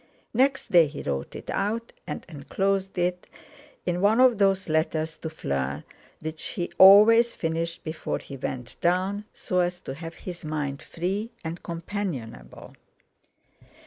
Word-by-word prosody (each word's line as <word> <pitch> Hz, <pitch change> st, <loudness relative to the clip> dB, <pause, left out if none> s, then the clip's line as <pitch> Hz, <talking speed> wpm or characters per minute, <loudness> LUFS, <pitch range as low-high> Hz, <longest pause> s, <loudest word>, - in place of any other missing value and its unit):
Next 270 Hz, +3 st, +2 dB
day 170 Hz, -3 st, +7 dB
he 145 Hz, -, -7 dB
wrote 70 Hz, -1 st, -3 dB
it -, -, -6 dB
out 225 Hz, +4 st, -2 dB
and -, -, -5 dB
enclosed 190 Hz, +6 st, -2 dB
it 180 Hz, 0 st, -1 dB, 0.6 s
in 175 Hz, 0 st, -1 dB
one 215 Hz, +4 st, +4 dB
of 250 Hz, -4 st, +5 dB
those 195 Hz, -1 st, +3 dB
letters 160 Hz, 0 st, 0 dB
to 160 Hz, -, -5 dB
Fleur 70 Hz, -, -3 dB, 0.4 s
which 155 Hz, 0 st, -5 dB
he 175 Hz, -3 st, -3 dB
always 220 Hz, +5 st, +8 dB
finished 165 Hz, +1 st, -2 dB
before 155 Hz, 0 st, -3 dB
he 140 Hz, -, -9 dB
went 125 Hz, -2 st, -5 dB
down, 190 Hz, +4 st, +1 dB
so 180 Hz, -, -2 dB
as 180 Hz, 0 st, 0 dB
to 135 Hz, -, -6 dB
have 165 Hz, +3 st, -8 dB
his 175 Hz, -2 st, -8 dB
mind 150 Hz, -3 st, -3 dB
free 195 Hz, +6 st, -3 dB, 0.2 s
and 165 Hz, +2 st, -4 dB
companionable. 170 Hz, -, -6 dB
175 Hz, 145 wpm, -26 LUFS, 155-195 Hz, 0.6 s, always